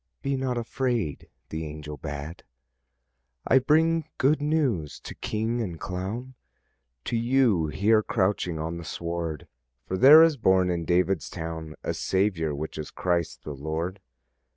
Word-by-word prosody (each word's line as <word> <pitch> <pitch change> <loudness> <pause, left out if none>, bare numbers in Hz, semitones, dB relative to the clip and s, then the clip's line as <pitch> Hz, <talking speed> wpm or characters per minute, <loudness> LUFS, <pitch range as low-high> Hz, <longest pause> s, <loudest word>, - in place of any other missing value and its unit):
"Be 140 0 0
not 130 -2 -1
afraid," 120 - -2 0.2
the 80 +1 -4
angel 75 -1 -7
bade. 70 +3 -6 1.0
"I 130 - +5
bring 160 +4 +3
good 145 +3 +3
news 140 - 0
to - - -8
king 115 +2 -2
and 90 -7 -4
clown, 105 +8 -5 0.7
To 120 - -1
you 115 -8 +3
here 105 +7 +3
crouching 95 -5 0
on 80 +2 -3
the 85 - -7
sward; 85 -1 -4 0.4
For 95 - -2
there 150 +9 +9
is 165 -3 +3
born 95 -5 +3
in 85 -1 -2
David's 90 0 +1
town 80 -1 -6
A - - -1
Saviour, 95 -6 0
which 80 +2 -5
is 75 - -5
Christ 85 -3 -1
the 75 - -5
Lord. 80 +7 -4
95 Hz, 145 wpm, -26 LUFS, 80-120 Hz, 1.0 s, there